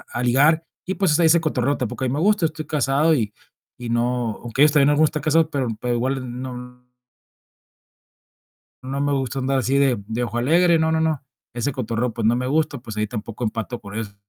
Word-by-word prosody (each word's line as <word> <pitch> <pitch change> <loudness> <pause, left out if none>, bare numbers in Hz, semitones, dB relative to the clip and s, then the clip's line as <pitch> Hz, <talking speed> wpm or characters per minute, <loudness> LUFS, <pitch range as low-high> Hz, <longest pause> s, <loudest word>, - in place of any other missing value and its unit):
a 120 - -4
ligar. 145 +7 +3 0.2
Y 190 - -2
pues 175 -5 +2
ahí 165 - +5
ese 165 +1 +5
cotorreo 140 -3 0
tampoco 125 +2 -3
a - - 0
mí 125 - -1
me 150 - -1
gusta, 205 -2 +3
estoy 155 -1 -6
casado 150 +2 +2
y 110 -6 -1 0.4
y 120 - -7
no, 120 -1 -1
aunque 120 +4 +1
ellos 150 - +7
también 145 -1 +4
algunos 150 +1 +4
están 150 -1 -5
casados, 155 +1 +3
pero 135 -5 -1
pero 125 -1 -1
igual 125 0 -2
no 125 -1 -8 2.0
no 135 +2 -4
me 145 0 +1
gusta 135 -1 -2
andar 135 +1 0
así 135 +2 +1
de 135 -3 +3
de 115 +2 -2
ojo 120 0 -4
alegre, 165 +6 +4
no, 160 0 +1
no, 160 - +1
no, 160 -4 0 0.3
ese 120 +4 -1
cotorreo 120 -2 -2
pues 115 -1 -2
no 120 - +3
me 125 +1 -2
gusta, 150 +1 0
pues 115 -3 -9
ahí 105 0 0
tampoco 115 +1 -6
empato 115 +2 -3
por 100 0 -9
eso. 110 -3 -5
130 Hz, 215 wpm, -22 LUFS, 120-150 Hz, 2.0 s, ellos